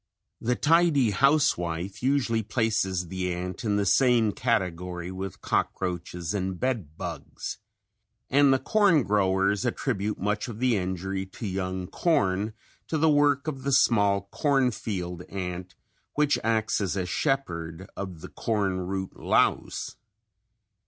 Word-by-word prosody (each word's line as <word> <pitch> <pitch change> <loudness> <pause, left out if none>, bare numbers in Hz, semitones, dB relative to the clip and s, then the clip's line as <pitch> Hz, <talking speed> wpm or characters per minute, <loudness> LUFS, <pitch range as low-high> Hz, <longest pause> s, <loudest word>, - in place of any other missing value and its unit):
The 125 +2 +1
tidy 155 -7 +4
housewife 100 - +1
usually 125 -4 +1
places 105 -6 0
the 90 0 -2
ant 90 +4 -4
in 105 -3 +1
the 100 0 +1
same 120 0 +4
category 90 -6 -1
with 95 -1 -6
cockroaches 90 -1 -2
and 95 -2 -2
bed 105 - -2
bugs - - -6 0.7
and 140 0 +5
the 135 - +5
corn 195 - +3
growers 100 -1 +2
attribute 105 +2 -1
much 105 +4 -1
of 115 -3 -7
the 125 0 +2
injury 95 0 -2
to 95 - -8
young 95 -1 -2
corn 105 - +1 0.3
to 160 - -1
the 160 +1 +4
work 145 -1 +3
of 135 -4 -3
the 140 +1 -1
small 100 -6 +4
cornfield 110 - 0
ant 90 -1 -5 0.4
which 150 0 +2
acts 110 -1 +1
as 100 -1 -1
a 95 - -1
shepherd 90 - -2
of 95 -5 -6
the - - -8
corn 100 -5 -1
root 95 0 -4
louse. - - 0
100 Hz, 130 wpm, -27 LUFS, 95-130 Hz, 0.7 s, and